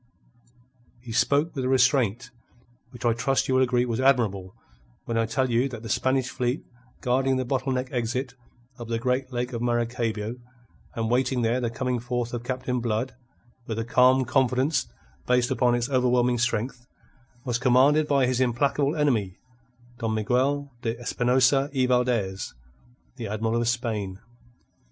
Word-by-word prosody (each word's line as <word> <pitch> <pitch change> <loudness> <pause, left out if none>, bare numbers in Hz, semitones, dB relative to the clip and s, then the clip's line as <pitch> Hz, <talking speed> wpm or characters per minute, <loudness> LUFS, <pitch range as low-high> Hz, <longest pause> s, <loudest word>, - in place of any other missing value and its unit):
He 120 - -8
spoke 140 +7 +2
with 135 - -2
a 130 - 0
restraint 125 -2 +2 0.6
which 120 -1 -9
I 120 - +4
trust 135 +4 0
you 130 - 0
will 130 - +4
agree 125 -1 +2
was 120 -1 -2
admirable 110 -8 +1 0.5
when 115 - -3
I 115 0 +1
tell 130 +2 0
you 120 +4 +2
that 120 -3 -8
the 115 - -7
Spanish 130 +3 +1
fleet 125 +2 -2 0.4
guarding 130 +2 +1
the 130 - -1
bottle 130 +1 -1
neck 130 0 -2
exit 125 +1 -2 0.5
of 120 - -7
the 115 0 -1
great 125 +2 -1
Lake 125 +1 -3
of 115 - -3
Maracaybo, 120 -2 -1 0.6
and 115 - -1
awaiting 125 +1 +1
there 120 +3 +1
the 120 - 0
coming 125 +1 -2
forth 120 0 -3
of 120 -1 -4
Captain 125 0 -2
Blood 115 +2 -2 0.5
with 110 - -3
a 115 - -2
calm 130 +2 +4
confidence 130 +3 +1 0.4
based 125 +1 +2
upon 125 -2 +2
its 120 0 -1
overwhelming 125 -2 +2
strength, 120 +1 -2 0.6
was 120 -2 -1
commanded 135 +5 +4
by 140 -3 +3
his 125 0 0
implacable 140 +4 +1
enemy, 115 - 0 0.6
Don 110 -1 -1
Miguel 135 +6 0
de 115 0 -3
Espinosa 130 +3 +2
y 130 -1 +3
Valdez, 120 - 0 0.6
the 115 -3 -5
Admiral 110 +3 -1
of 120 - -1
Spain. 110 -6 -2
125 Hz, 160 wpm, -25 LUFS, 115-130 Hz, 0.6 s, I